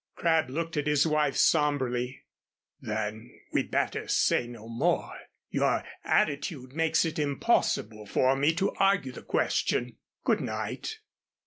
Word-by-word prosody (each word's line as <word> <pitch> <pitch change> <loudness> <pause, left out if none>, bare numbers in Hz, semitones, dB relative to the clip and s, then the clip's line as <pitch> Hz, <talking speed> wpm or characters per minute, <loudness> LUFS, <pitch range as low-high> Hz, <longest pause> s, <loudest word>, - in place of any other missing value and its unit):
Crabb 160 -4 +2
looked 165 +3 -3
at 150 0 0
his 150 0 +3
wife 150 -3 +1
sombrely. 130 -5 +1 0.6
"Then 110 +1 -5
we'd - - 0
better - - -1
say 120 - +2
no 115 -2 -10
more. 140 +10 0 0.4
Your - - +1 0.2
attitude 140 -3 0
makes 165 +2 +2
it 160 -1 -3
impossible 115 -6 0
for 130 +6 +3
me 145 +3 +3
to 195 - 0
argue 195 -9 +2
the - - -10
question. - - 0 0.3
Good - - +2
night." 440 - -4
145 Hz, 130 wpm, -28 LUFS, 120-160 Hz, 0.6 s, his